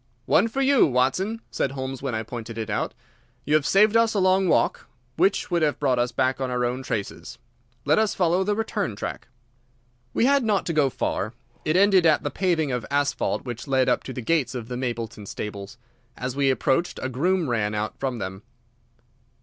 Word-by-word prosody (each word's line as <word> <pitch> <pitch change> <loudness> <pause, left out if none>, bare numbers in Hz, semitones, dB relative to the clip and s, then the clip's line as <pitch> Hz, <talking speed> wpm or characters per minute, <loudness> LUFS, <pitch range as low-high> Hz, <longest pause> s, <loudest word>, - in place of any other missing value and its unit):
"One 195 - +4
for 265 +4 -2
you, 275 -1 +5
Watson," 150 - 0
said 135 - -1
Holmes, 130 -1 -5
when 135 -4 -2
I 110 - -2
pointed 115 -1 -7
it 110 -2 -4
out. - - -2 0.5
"You 150 - 0
have 155 -2 +3
saved 210 +3 +4
us 230 -1 +3
a - - +2
long 185 0 +3
walk, - - +1 0.3
which 190 +3 +1
would 170 -1 +2
have 150 -2 +1
brought 130 -4 +1
us 120 0 +1
back 130 +2 0
on 130 - -1
our 125 -1 0
own 125 +2 -2
traces. 115 -6 -5 0.5
Let - - +4
us 220 -1 +1
follow 180 +1 +2
the 205 +2 0
return 210 - -2
track." - - -6 0.8
We 230 - +2
had 280 0 +4
not 210 -3 +1
to 170 - -1
go 150 -3 +3
far. 110 -3 -2 0.3
It 155 +3 +2
ended 190 -3 +5
at 155 - +3
the 145 - -2
paving 170 -6 0
of 125 -2 -2
asphalt 145 -1 0
which 120 +2 -6
led 130 -1 +2
up 125 - +2
to - - -5
the 125 - -6
gates 150 -1 0
of 120 -1 -6
the 125 - -4
Mapleton 115 -4 -4
stables. 105 +3 -6 0.4
As 125 0 -4
we 140 -1 +2
approached, 135 +7 0
a - - 0
groom 165 +7 0
ran 110 -4 0
out 105 +1 -2
from 130 -3 -2
them. 95 -2 -5
135 Hz, 205 wpm, -24 LUFS, 125-185 Hz, 0.8 s, you